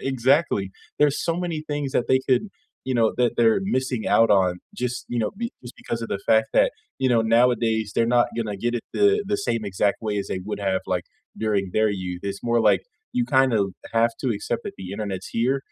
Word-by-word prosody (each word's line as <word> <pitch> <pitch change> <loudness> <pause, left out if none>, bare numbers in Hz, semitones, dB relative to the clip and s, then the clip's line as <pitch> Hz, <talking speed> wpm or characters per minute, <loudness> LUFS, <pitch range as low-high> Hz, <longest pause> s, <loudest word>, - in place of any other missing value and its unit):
exactly, 130 - +1 0.3
there's 150 -1 +3
so 165 - +1
many 175 -3 -2
things 145 -1 -2
that 120 - +1
they 130 0 +4
could, 130 +6 +3 0.4
you 130 - 0
know, 115 -2 +3
that 120 -1 +3
they're 115 +3 +4 0.2
missing 130 -4 -2
out 115 - +5
on 90 -1 +1 0.3
just, 125 -1 -2
you 120 - 0
know, 110 - 0
be 235 - -1
just 120 0 -10
because 115 - -3
of 115 - -5
the - - -2
fact 110 0 +5
that, - - +5 0.3
you 130 - +4
know, 115 -2 +4 0.2
nowadays, 115 -3 +2
they're 115 - +2
not 120 - +3
gonna 110 -3 -2
get 120 0 +1
it - - -12 0.2
the 410 +1 +4
the - - +3
same 115 - 0
exact 100 +2 +1
way 105 -1 -1
as 100 - -4
they - - -2
would 105 - -3
have, 95 0 0
like, 90 -1 -2 0.4
during 100 -3 0
their 110 0 +3
youth, 90 -1 -5
it's 100 0 -6
more 120 0 +4
like - - +1 0.3
you 245 - +2
kinda 130 -4 +4 0.4
have 115 +1 +4
to 130 - -1
accept - - -3
that - - -5
the 95 -1 -7
internet's 100 -3 -4
here, 130 +4 +2
115 Hz, 220 wpm, -24 LUFS, 105-130 Hz, 0.4 s, out